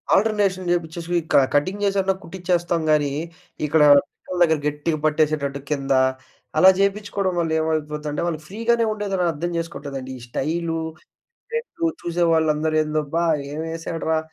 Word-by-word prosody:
Alternation 195 -3 +1
జేపిచ్చేసి 170 0 -1 0.2
క - - +5 0.2
cutting 185 +8 +1
జేసన్నా 195 -1 +2
కుట్టిచేస్తాం 175 -1 -1
గాని 145 -2 +2 0.5
ఇక్కడ 150 +1 +3 0.2
పిక్కల 180 +4 -9
దగ్గర 160 -2 +3
గట్టిగా 150 +2 -1
పట్టేసేటట్టు 150 -2 +1
కిందా 135 -3 +2 0.6
అలా 190 - +9
జేపిచ్చుకోవడం 200 -1 0
వల్ల 165 -2 0
ఏమైపోద్దంటే 150 -1 -2
వాళ్ళు 160 -3 -2
ఫ్రీగానే 230 +4 +1
ఉండదని 200 -3 -2
అర్థం 170 +4 -3
చేసుకోట్లేదండి. 140 -5 -5
ఈ - - -14
స్టైలు, 165 +6 -2 0.7
ట్రెండు 465 -8 -2
చూసేవాళ్ళందరూ 160 -2 +1
ఏందబ్బా 155 +2 -1 0.3
ఏమేసాడురా 160 +1 -2
165 Hz, 115 wpm, -22 LUFS, 150-185 Hz, 0.7 s, అలా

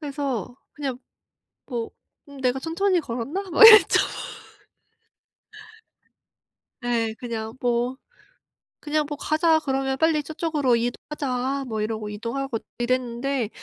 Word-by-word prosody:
그래서 275 - -4 0.2
그냥 270 -4 -4 0.7
뭐 235 -3 -4 0.4
음 280 -1 -11
'내가 255 0 +1
천천히 350 +4 0
걸었나?' 285 +10 -4
막 445 +6 +10
이랬죠. 430 -2 +8 2.8
예. 230 -2 0
그냥 225 -1 -5
뭐 245 +1 0 0.8
그냥 300 0 0
뭐 295 - -4
"가자." 315 +1 +2
그러면 270 -2 -1
"빨리 315 -1 +2
저쪽으로 300 -4 0
이동하자." 260 +2 -2
뭐 220 -1 -2
이러고 215 -1 -3
이동하고 230 +3 -4 0.2
이랬는데 250 0 -1
265 Hz, 235 characters per minute, -24 LUFS, 235-300 Hz, 2.8 s, 막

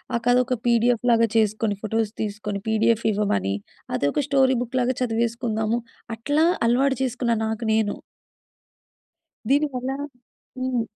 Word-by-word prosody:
ఆ - - +3
కథ 245 - +5
ఒక 255 -2 -1
పిడిఎఫ్ 235 0 +2
లాగా 230 0 +4
చేసుకొని, 215 -1 +1
ఫోటోస్ 220 0 -1
తీసుకొని, 205 -1 -4
పిడిఎఫ్ 220 +1 +2
ఇవ్వమని 100 - 0 0.4
అదొక 140 - 0
స్టోరీ 265 -2 +4
బుక్ 250 +1 -3
లాగా 250 +1 0
చదివేసుకుందాము. 230 -1 0 0.4
అట్లా 290 +8 +1 0.2
అలవాటు 265 +2 +2
చేసుకున్నా 245 -2 0
నాకు 220 +1 -3
నేను. 220 -2 +1 1.5
దీనివల్ల 270 -3 +1 0.7
హ్మ్. 255 -2 0
230 Hz, 120 wpm, -23 LUFS, 215-255 Hz, 1.5 s, కథ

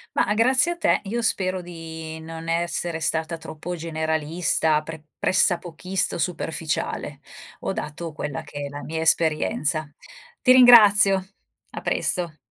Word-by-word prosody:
Ma - - +1
grazie 260 +9 +3
a - - -15
te, - - +2
io 230 +4 -3
spero 185 -3 0
di 160 -2 -8
non 165 +1 -9
essere 170 0 -1
stata 160 +1 -1
troppo 160 +3 -7
generalista, 160 -1 0
pre 160 -1 -9
pressapochista 185 0 +1
o - - -8
superficiale. 165 -2 -3 0.4
Ho - - -2
dato 160 +2 -6
quella 150 +1 -5
che 150 -1 -9
è - - -6
la 145 +1 -8
mia 160 +1 -4
esperienza. 155 -1 +1 0.5
Ti 255 - +4
ringrazio. 210 -6 +7 0.5
A - - -7
presto. 170 -4 -1
165 Hz, 135 wpm, -23 LUFS, 160-185 Hz, 0.5 s, ringrazio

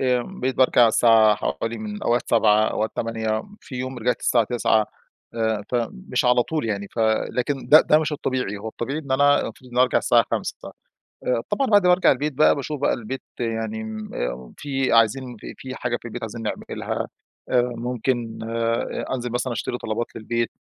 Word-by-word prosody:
آمم 130 +8 -1
بقيت 130 +1 0
بارجع 125 -2 +5
الساعة 110 -1 +5
حوالي 105 +5 -3
من 105 -1 -6
أوقات 120 +1 0
19:00 110 -2 +5
أوقات 110 +1 -1
20:00 110 -1 -1 0.2
في 130 - -11
يوم 130 0 -4
رجعت 125 +2 0
الساعة 120 -2 +3
21:00 110 -2 +2 0.5
آآ 110 -2 -1
فمش 115 - -2
على 125 0 +4
طول 155 -2 -3
يعني، 100 -2 -3
ف - - -10 0.3
لكن 135 +2 -2
ده 155 +2 +9
ده 155 - +4
مش 155 -1 -1
الطبيعي 130 -7 -2
هو 110 +2 -6
الطبيعي 135 +7 -4
إن 140 -4 -4
أنا 145 +1 +4
المفروض 125 -1 -8
ان 120 - -9
أنا 125 - +6
أرجع 130 - +3
الساعة - - +4
17:00 - - -2 0.7
آآ - - +2
طبعًا 275 -1 +1
بعد 205 -4 +5
ما - - +6
ارجع 185 - +4
البيت 145 +2 -1
بقى 150 +4 +4
باشوف 145 0 -4
بقى - - +3
البيت 125 +3 -5 0.2
يعني 110 -2 -2
آمم، 110 -1 -7
آآ 60 0 -4
في 135 -4 -1
عايزين 120 +2 +2
في - - -8
في 130 0 -7
حاجة 120 -2 -2
في - - -15
البيت 120 +1 -6
عايزين 115 +1 -6
نعملها - - -4 0.4
آآ 125 -1 +4 0.2
ممكن 120 -1 -2
آآ 115 0 -1
أنزل 125 -2 -3
مثلًا 125 +1 -1
أشتري 125 +2 -3
طلبات 115 +1 -2
للبيت، 115 +1 -2
120 Hz, 190 wpm, -23 LUFS, 110-130 Hz, 0.7 s, ده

